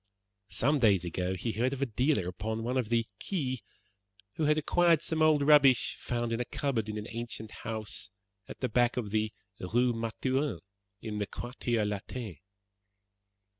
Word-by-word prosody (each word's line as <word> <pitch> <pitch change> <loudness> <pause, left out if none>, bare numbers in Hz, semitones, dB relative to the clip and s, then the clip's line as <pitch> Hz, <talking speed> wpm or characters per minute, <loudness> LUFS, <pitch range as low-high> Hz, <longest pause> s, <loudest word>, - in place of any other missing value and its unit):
Some 140 +10 +2
days 100 -7 +4
ago 90 +2 -1
he 115 +5 -2
heard 125 +5 0
of 140 - -5
a - - +3
dealer 125 - +1
upon 110 +5 -3
one 125 +2 -1
of 125 -4 0
the 115 -1 +2
Quais 130 - -2 0.7
who 155 - -1
had 150 +1 +4
acquired 170 +1 +4
some 160 -1 -1
old 155 -2 +5
rubbish 140 -4 +6
found 120 -1 -2
in 115 - -1
a 125 - -1
cupboard 120 -7 -1
in 105 - -3
an 105 - -4
ancient 115 -1 -5
house 110 -5 -5 0.4
at - - -10
the 130 - +1
back 120 -1 +2
of 110 -5 -2
the 110 0 +1 0.3
Rue 120 +6 +2
Mathurin, 115 - -1 0.4
in 105 -2 -3
the 105 - -1
Quartier 120 -2 -2
Latin. 105 - -4
120 Hz, 170 wpm, -30 LUFS, 110-130 Hz, 0.7 s, rubbish